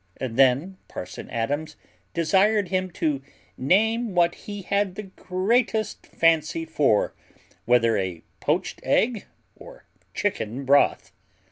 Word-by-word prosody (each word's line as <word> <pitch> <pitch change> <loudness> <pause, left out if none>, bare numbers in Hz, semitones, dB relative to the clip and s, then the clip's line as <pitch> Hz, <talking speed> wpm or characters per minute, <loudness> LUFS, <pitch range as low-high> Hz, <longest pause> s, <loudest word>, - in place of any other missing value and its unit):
Then 135 +8 +2
parson - - -8
Adams 145 +7 -2 0.4
desired 195 +4 +3
him 185 -1 0
to 150 -5 -1 0.3
"name 220 - +1
what 170 -1 +4
he 205 -3 -8
had 200 -1 0
the 210 - -5
greatest 210 +4 -1
fancy 165 0 +1
for; 145 -9 +2 0.5
whether 115 -3 +3
a 90 -3 -4 0.2
poached - - -1
egg, 230 -2 +1 0.3
or - - -14 0.3
chicken 135 - -2
broth." 140 +2 +3
170 Hz, 110 wpm, -24 LUFS, 135-205 Hz, 0.5 s, what